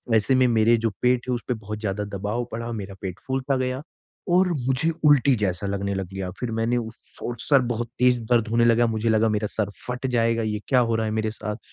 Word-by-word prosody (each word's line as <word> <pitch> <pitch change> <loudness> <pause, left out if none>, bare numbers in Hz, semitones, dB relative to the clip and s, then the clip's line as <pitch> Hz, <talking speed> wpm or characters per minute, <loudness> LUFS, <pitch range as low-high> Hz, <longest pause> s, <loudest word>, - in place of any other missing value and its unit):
ऐसे 110 +4 +3
में 130 0 +4
मेरे 115 0 +4
जो - - +3
पेट 125 0 +2
है - - +2
उसपे 120 +1 -3
बहुत 105 -2 -6
ज़्यादा 105 -1 -2
दबाव 105 +5 -2
पड़ा 115 +1 -4
मेरा 100 -3 -6
पेट 95 -2 -5
फूलता 135 +1 0
गया 130 +1 -2 0.5
और 185 +1 +5 0.2
मुझे 135 +5 +1 0.2
उल्टी 140 -2 +5
जैसा 100 -3 -1
लगने 100 0 -2
लग 95 -1 -3
गया। 95 -1 -4
फिर 125 -2 -3
मैंने 115 +2 +1
उस 115 -1 -6 0.3
और 120 - -3
सर 140 -3 +4
बहुत 120 -1 -2
तेज़ 125 0 +4
दर्द 120 -2 +3
होने 115 +1 +3
लगा, 120 0 +4
मुझे 110 0 -1
लगा 110 0 +3
मेरा 105 0 0
सर 105 -2 -1 0.2
फट 125 +2 -3
जाएगा 115 -2 +1
ये 105 -1 -2
क्या 130 - +4
हो 115 -2 +2
रहा 110 0 0
है 110 - -2
मेरे 110 0 -1
साथ, 105 0 -5
115 Hz, 230 wpm, -24 LUFS, 105-125 Hz, 0.5 s, और